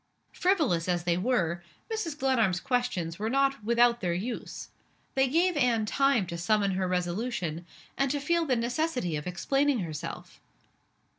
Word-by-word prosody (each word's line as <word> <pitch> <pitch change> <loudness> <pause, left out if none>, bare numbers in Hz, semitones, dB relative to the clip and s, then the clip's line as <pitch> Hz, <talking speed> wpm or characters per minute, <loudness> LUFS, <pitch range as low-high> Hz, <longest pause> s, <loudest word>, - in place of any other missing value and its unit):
Frivolous 305 - +1
as 175 -1 0
they 175 -1 +1
were, 175 -5 0 0.3
Mrs. 335 -9 -3
Glenarm's 230 -10 +2
questions 190 -9 -1
were 215 +1 -1
not 275 -1 +1
without 235 +1 +3
their 175 -3 0
use. 230 +7 -5 0.4
They 265 0 +3
gave 340 +6 +2
Anne 240 -6 +2
time 275 -2 +2
to 170 -1 -6
summon 200 +2 +2
her 185 0 -1
resolution, 180 -2 -2 0.3
and 275 0 +2
to 290 +2 0
feel 335 +3 +1
the 260 - +2
necessity 245 - -1
of 150 +3 -4
explaining 270 +8 +1
herself. 155 -4 -6
235 Hz, 150 wpm, -28 LUFS, 180-275 Hz, 0.4 s, without